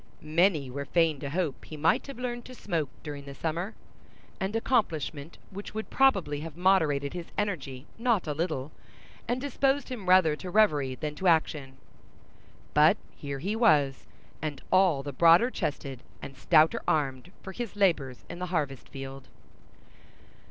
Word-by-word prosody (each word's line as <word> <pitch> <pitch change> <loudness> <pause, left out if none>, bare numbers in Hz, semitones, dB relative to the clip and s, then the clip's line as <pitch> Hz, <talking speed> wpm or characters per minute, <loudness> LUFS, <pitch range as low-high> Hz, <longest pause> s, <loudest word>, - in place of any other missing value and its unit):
Many 155 -3 +2
were 140 +2 -4
fain 165 -2 +2
to 140 - -4
hope 160 -2 -2
he 155 - -9
might 160 - +2
have 275 - -8
learned 240 -1 -4
to 255 - -10
smoke 165 - -2
during 145 -2 -7
the 140 0 -9
summer, 170 - -3 0.6
an 195 +3 -2
accomplishment 165 - -1
which 200 +2 -8
would 220 - -5
probably 195 - +3
have 160 +1 -8
moderated 160 -7 +2
his 175 -2 -6
energy 145 -10 -3
not 230 -5 +2
a 150 - -2
little, 155 -3 -2 0.6
and 245 +2 0
disposed 280 +1 0
him 215 -8 -5
rather 180 -5 +6
to 180 +4 -8
reverie 150 -11 +3
than 150 +2 -4
to 185 +5 -2
action. 150 -5 +1 1.0
But - - +6 0.2
here 140 -1 -5
he 195 +10 -2
was, 150 - +3 0.3
and 150 -3 -3
all 185 -7 +4
the 145 0 -5
broader 170 - +6
chested 135 - -4 0.2
and 135 - -9
stouter 155 +4 +4
armed 150 -2 0
for 190 - -6
his 230 0 -6
labors 155 - +1
in 175 - -8
the 180 - -3
harvest 145 -7 -2
field. 135 0 -8
160 Hz, 160 wpm, -28 LUFS, 140-195 Hz, 1.0 s, rather